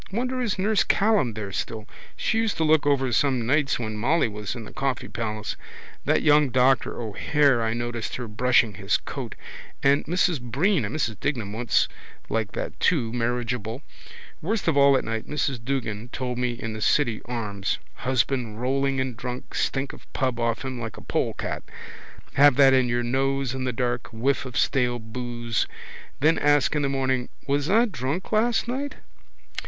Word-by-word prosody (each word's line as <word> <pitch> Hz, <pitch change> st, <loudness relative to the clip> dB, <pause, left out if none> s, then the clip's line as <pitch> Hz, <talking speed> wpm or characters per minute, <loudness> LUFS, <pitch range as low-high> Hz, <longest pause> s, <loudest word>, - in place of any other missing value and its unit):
Wonder 255 Hz, +4 st, -1 dB
is 230 Hz, -5 st, -1 dB
nurse 205 Hz, +2 st, +2 dB
Callan 200 Hz, -, +2 dB
there 105 Hz, -2 st, -5 dB
still. 110 Hz, +2 st, -4 dB, 0.3 s
She 225 Hz, -, +1 dB
used 225 Hz, -2 st, 0 dB
to 160 Hz, -, +1 dB
look 155 Hz, -1 st, +4 dB
over 135 Hz, -3 st, +2 dB
some 130 Hz, -1 st, +2 dB
nights 140 Hz, +3 st, +2 dB
when 110 Hz, -3 st, -4 dB
Molly 145 Hz, +7 st, +2 dB
was 105 Hz, +1 st, -5 dB
in 115 Hz, -3 st, -7 dB
the -, -, -11 dB
Coffee 135 Hz, -2 st, -2 dB
Palace. 110 Hz, -2 st, -3 dB, 0.5 s
That -, -, +2 dB
young 150 Hz, -2 st, +5 dB
doctor 130 Hz, +1 st, +2 dB
O'Hare 125 Hz, +4 st, +2 dB
I 110 Hz, 0 st, 0 dB
noticed 120 Hz, -1 st, -3 dB
her 125 Hz, -2 st, -5 dB
brushing 115 Hz, 0 st, +3 dB
his 100 Hz, -2 st, +1 dB
coat. -, -, -6 dB, 0.5 s
And 140 Hz, +1 st, +4 dB
Mrs 175 Hz, -3 st, +1 dB
Breen 140 Hz, -, +1 dB
and 105 Hz, -, -4 dB
Mrs 115 Hz, -10 st, -1 dB
Dignam 120 Hz, -8 st, -2 dB
once 115 Hz, +1 st, +2 dB, 0.4 s
like 110 Hz, -2 st, -1 dB
that -, -, -5 dB
too, 120 Hz, -10 st, +2 dB
marriageable. 120 Hz, +1 st, -2 dB, 0.6 s
Worst 205 Hz, +5 st, -1 dB
of 160 Hz, -, +3 dB
all 140 Hz, -1 st, +6 dB
at -, -, -1 dB
night 115 Hz, -1 st, -3 dB
Mrs 140 Hz, -5 st, -1 dB
Duggan 115 Hz, -4 st, -3 dB
told 125 Hz, -1 st, -3 dB
me 125 Hz, -1 st, 0 dB
in 115 Hz, -2 st, -5 dB
the 110 Hz, -, -6 dB
City 120 Hz, -2 st, +2 dB
Arms. 105 Hz, -5 st, -2 dB, 0.2 s
Husband 125 Hz, -3 st, 0 dB
rolling 135 Hz, +2 st, 0 dB
in 130 Hz, -1 st, -1 dB
drunk, 125 Hz, +2 st, -6 dB
stink 135 Hz, 0 st, -1 dB
of -, -, -15 dB
pub 130 Hz, -3 st, 0 dB
off 115 Hz, +2 st, -1 dB
him 130 Hz, -2 st, -4 dB
like 115 Hz, -1 st, -6 dB
a -, -, -9 dB
polecat. -, -, -2 dB, 0.7 s
Have 145 Hz, -1 st, +6 dB
that 135 Hz, -1 st, +6 dB
in 130 Hz, -2 st, +3 dB
your 120 Hz, 0 st, 0 dB
nose 135 Hz, +1 st, 0 dB
in 130 Hz, -1 st, -3 dB
the 125 Hz, -, 0 dB
dark, 120 Hz, 0 st, -1 dB
whiff 130 Hz, +4 st, 0 dB
of 125 Hz, -, -5 dB
stale 125 Hz, -3 st, +2 dB
boose. 120 Hz, -1 st, -3 dB, 0.5 s
Then 160 Hz, +3 st, +4 dB
ask 145 Hz, 0 st, +3 dB
in 150 Hz, -, +1 dB
the 140 Hz, -, +1 dB
morning: 130 Hz, -2 st, 0 dB, 0.2 s
was 145 Hz, +1 st, 0 dB
I 225 Hz, +4 st, +5 dB
drunk 155 Hz, -, -3 dB
last 230 Hz, +2 st, +2 dB
night? 275 Hz, +4 st, -3 dB
130 Hz, 180 wpm, -25 LUFS, 115-145 Hz, 0.7 s, all